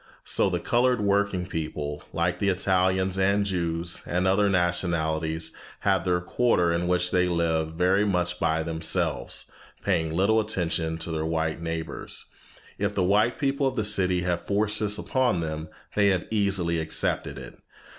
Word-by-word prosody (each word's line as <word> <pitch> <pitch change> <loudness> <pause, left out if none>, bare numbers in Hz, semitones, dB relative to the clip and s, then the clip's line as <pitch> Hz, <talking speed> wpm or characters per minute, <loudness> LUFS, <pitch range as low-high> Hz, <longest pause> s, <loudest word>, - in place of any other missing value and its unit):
So - - +2
the - - -1
colored 125 +1 +2
working 100 -2 +1
people, 75 -4 -4
like 90 +1 0
the 100 - +2
Italians 95 0 +1
and 100 +1 +2
Jews 85 -3 -2
and 90 +2 0
other 100 +2 +3
nationalities, 80 -3 0 0.3
have 95 -3 +2
their 90 -1 +2
quarter 90 -3 +2
in 85 +1 -1
which 90 0 +1
they 90 0 +3
live 80 -2 0
very 90 +4 +2
much 90 -3 0
by 80 -1 +1
themselves, 80 -6 -2 0.3
paying 80 -5 +1
little 100 +7 +3
attention 85 -6 -1
to 80 +1 -4
their 80 -1 -2
white 80 0 -1
neighbors. 80 -1 -5 0.5
If - - -1
the - - +2
white 105 +6 +3
people 140 -1 +1
of 130 - -2
the 110 -4 -1
city 95 -3 +2
have 90 -1 -1
forced 105 +1 +1
this 105 -1 +1
upon 130 -8 +1
them, 80 -1 -4 0.2
they 100 -1 +3
have 95 -3 +1
easily 95 -6 +1
accepted 80 - 0
it. - - -10
90 Hz, 160 wpm, -26 LUFS, 80-100 Hz, 0.5 s, other